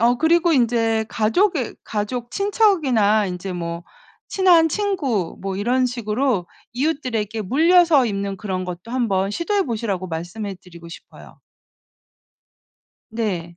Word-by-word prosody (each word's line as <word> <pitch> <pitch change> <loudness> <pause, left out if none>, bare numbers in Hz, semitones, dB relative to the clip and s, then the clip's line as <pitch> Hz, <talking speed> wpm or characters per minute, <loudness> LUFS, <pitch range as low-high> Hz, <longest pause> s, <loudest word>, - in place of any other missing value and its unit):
어 240 +2 +3
그리고 335 +2 +3
인제 230 -4 +2
가족의 255 - 0
가족 230 +3 -4
친척이나 290 - +2
인제 185 +1 -5
뭐 170 0 -5 0.4
친한 350 -4 +4
친구 295 - -1
뭐 195 0 -4
이런 250 +5 +1
식으로 235 -4 -1 0.3
이웃들에게 245 -6 -2
물려서 320 - +4
입는 200 -2 -3
그런 185 -2 -4
것도 180 +4 -8
한번 200 -6 0
시도해 390 - 0
보시라고 215 -7 -3
말씀해 180 +5 -5
드리고 170 -2 -13
싶어요. 165 - -14 1.7
네. 185 -7 -3
225 Hz, 270 characters per minute, -21 LUFS, 195-285 Hz, 1.7 s, 친한